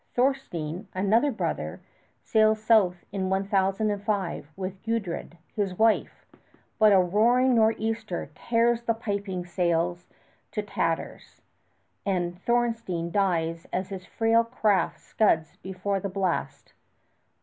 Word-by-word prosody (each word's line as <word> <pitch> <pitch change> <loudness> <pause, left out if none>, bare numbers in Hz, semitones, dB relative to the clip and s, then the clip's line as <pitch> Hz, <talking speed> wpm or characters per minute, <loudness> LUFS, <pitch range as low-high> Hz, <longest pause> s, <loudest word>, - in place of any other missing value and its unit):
Thornstein, 210 - -1
another 220 +9 +3
brother, 225 - -3 0.4
sails 220 -1 +3
south 210 -5 +3
in 190 -1 -2
1005 195 -2 0
with 190 0 -6
Gudrid, 205 -7 -3 0.2
his 195 -4 -1
wife; 220 0 +1 0.5
but 215 -1 +6
a 195 - +7
roaring 230 +8 +3
nor'easter 220 -6 0
tears 235 +5 +1
the 230 -1 0
piping 200 -5 -3
sails 175 0 0 0.5
to 210 - -2
tatters, 165 -5 -3 0.6
and 180 -2 -2
Thornstein 230 -8 0
dies 165 -4 0
as 185 +1 -2
his 190 -2 -7
frail 230 0 +3
craft 215 -6 +1
scuds 160 -7 +1
before 190 +1 -3
the 200 - -4
blast. 190 -2 -2
200 Hz, 110 wpm, -26 LUFS, 180-225 Hz, 0.6 s, a